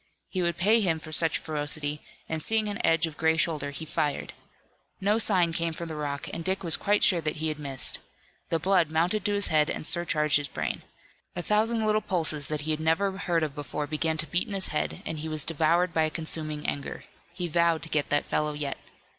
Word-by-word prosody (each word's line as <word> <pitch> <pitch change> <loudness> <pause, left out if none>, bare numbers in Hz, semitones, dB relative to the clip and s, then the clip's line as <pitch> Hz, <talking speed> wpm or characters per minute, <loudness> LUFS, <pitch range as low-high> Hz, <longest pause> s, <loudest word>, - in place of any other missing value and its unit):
He 185 - -2
would 170 -1 0
pay 215 +6 +4
him 170 -5 +1
for 155 0 -10
such 160 0 +5
ferocity, 150 -1 -2 0.3
and 160 -1 -3
seeing 220 +4 +1
an 205 +2 -4
edge 165 +1 +3
of 155 -2 -8
gray 160 0 +2
shoulder, 155 -3 0
he 145 +3 -7
fired. 150 -2 -2 0.7
No 205 +3 +2
sign 180 -7 +3
came 165 0 -1
from 170 +1 -6
the 160 - -5
rock, 145 -2 -4
and 165 - -4
Dick 190 +3 -1
was 165 -3 +3
quite 205 +1 +1
sure 175 -3 +6
that 155 -1 -2
he 160 +1 -1
had 155 0 -4
missed. 135 -3 +1 0.5
The 165 - +1
blood 175 -1 +2
mounted 175 +6 +1
to 205 - +1
his 205 0 +2
head 155 -1 +3
and - - -3
surcharged 155 -4 +2
his 145 -1 -3
brain. - - -3 0.5
A 175 - -3
thousand 220 +2 +1
little 215 0 +2
pulses 155 -7 0
that 150 -1 -3
he 155 +2 -2
had 155 - 0
never 170 +5 +1
heard 170 -4 0
of 150 -3 -2
before 145 0 -4
began 160 +1 -1
to 155 - 0
beat 175 - +1
in 205 - -4
his 190 - +2
head, 150 - -2
and 160 - -4
he 160 +1 -5
was 155 -2 +4
devoured 165 +2 +2
by 160 -1 +3
a - - -1
consuming 155 -1 -3
anger. 140 - -4 0.3
He 180 -1 -2
vowed 170 0 +2
to 165 - -7
get 150 -2 0
that 145 - +1
fellow 150 0 -1
yet. 145 -2 -4
160 Hz, 230 wpm, -27 LUFS, 150-180 Hz, 0.7 s, sure